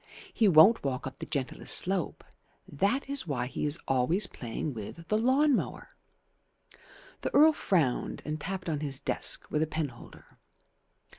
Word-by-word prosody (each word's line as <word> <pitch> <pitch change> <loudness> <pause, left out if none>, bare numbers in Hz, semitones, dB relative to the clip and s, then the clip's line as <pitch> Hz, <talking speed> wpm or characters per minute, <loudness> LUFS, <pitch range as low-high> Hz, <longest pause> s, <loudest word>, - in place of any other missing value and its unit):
He 220 - +3
won't 190 +6 +6
walk 130 -2 -3
up 135 - -8
the - - -7
gentlest 135 -3 0
slope. 185 -2 -2 0.4
That 200 - -1
is 280 -7 -2
why 125 -5 -2
he 135 - -3
is 145 +2 +1
always 135 +10 +2
playing 125 0 -5
with 120 +9 -9
the 215 - +2
lawn 270 +4 +3
mower." - - -4 1.3
The - - -3
Earl 310 +2 +7
frowned 160 - -1
and 155 0 -4
tapped 185 +2 -5
on 155 -3 -1
his 140 -3 -4
desk - - +1
with 150 - 0
a 160 - +1
penholder. 150 -6 -7
160 Hz, 155 wpm, -29 LUFS, 135-200 Hz, 1.3 s, Earl